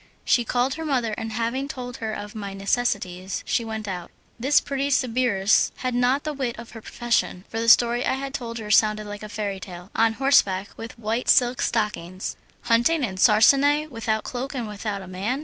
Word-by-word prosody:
She 240 - +3
called 245 +3 0
her 320 - -5
mother, 250 -7 0
and 225 0 -5
having 235 +5 -2
told 250 -3 -6
her 220 -1 -4
of 205 -1 -6
my 200 -2 -6
necessities 195 -3 -1
she 235 - 0
went 220 -1 -5
out. 180 -3 -5 0.3
This 270 +5 +4
pretty 275 0 -2
sbirress 240 -6 +2
had 255 -1 -3
not 250 +3 +2
the 305 - -3
wit 260 -4 -3
of 235 0 -10
her 225 - -10
profession, 235 -6 -1
for 225 - -4
the 230 0 +1
story 240 +1 +5
I - - +1
had 275 0 -5
told 235 -4 -5
her 210 -2 -5
sounded 215 0 +3
like 205 0 -7
a 215 - -8
fairy 205 -2 -3
tale. 180 0 -10
On 225 0 +3
horseback 225 -7 +3
with 225 +1 -9
white 230 +2 -2
silk 245 -1 +4
stockings! 190 -5 -2 0.3
Hunting 240 +6 +3
in 190 -6 -3
sarcenet, 280 +9 +4
without 220 -2 -1
cloak 265 +3 -5
and 240 -4 -3
without 205 -1 -4
a - - -11
man! 200 +9 -2
230 Hz, 200 wpm, -24 LUFS, 210-255 Hz, 0.3 s, story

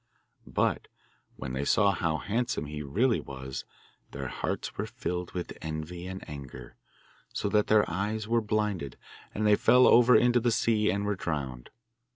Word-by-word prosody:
But - - 0 0.5
when 65 - -6
they 65 +2 -1
saw 100 +7 +4
how 85 -4 0
handsome 115 -3 -1
he 75 +1 -6
really 110 - +1
was 65 -1 -7 0.4
their - - -5
hearts - - -3
were - - -3
filled 90 0 -4
with 90 -1 -5
envy 80 +3 -5
and 95 0 -7
anger, 65 -4 -9 0.6
so - - -2
that 105 0 +2
their 105 -1 +4
eyes 105 +5 -2
were 115 +1 +2
blinded, 105 - -2 0.4
and 110 - 0
they 105 0 +6
fell 125 +4 +5
over 120 +1 +7
into 120 0 +5
the 120 +1 +1
sea 105 0 +2
and 100 +1 0
were 105 - +1
drowned. 70 -9 -4
95 Hz, 165 wpm, -29 LUFS, 75-110 Hz, 0.6 s, over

